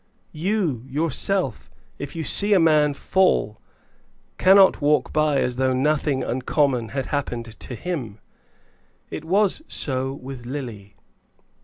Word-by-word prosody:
You, 165 - -1
yourself, 155 - -1 0.3
if 145 +2 -7
you 165 - -3
see 205 +7 +2
a 195 - +5
man 150 -3 +3
fall, 160 - +1 0.8
cannot 190 -2 +6
walk 145 -3 +2
by 155 -2 +2
as 125 0 -2
though 130 0 +1
nothing 140 0 +1
uncommon 130 -1 0
had 135 -1 -3
happened 120 -5 -4
to 125 - -8
him. 125 - -5 0.9
It - - -5
was 195 - +1
so 130 -1 -1
with 135 -2 -9
Lily. 120 -7 -7
145 Hz, 125 wpm, -23 LUFS, 125-165 Hz, 0.9 s, cannot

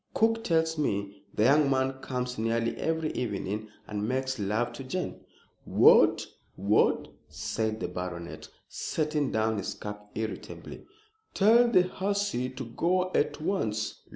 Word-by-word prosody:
"Cook 225 0 +2
tells 160 -1 +1
me 100 -7 -2
the 105 - +1
young 140 +4 +5
man 135 0 +1
comes 125 -2 -3
nearly 115 +1 0
every 160 -1 -1
evening, 105 -1 -3 0.2
and 105 0 -3
makes 130 -1 -1
love 110 +4 0
to 135 - -7
Jane!" 180 +8 -4 0.4
"What! - - +5 0.3
what!" 100 +3 +2 0.2
said 110 -1 -2
the - - -2
baronet, 90 -1 -6 0.2
setting 150 -3 -1
down 110 -1 +1
his 95 - -4
cup 105 0 -8
irritably. 110 0 -6 0.5
"Tell 230 +4 +6
the 190 -6 +5
hussy 195 -8 -1
to 130 0 -7
go 180 +10 0
at 145 - +1
once. 110 - -2
125 Hz, 135 wpm, -28 LUFS, 110-160 Hz, 0.5 s, Tell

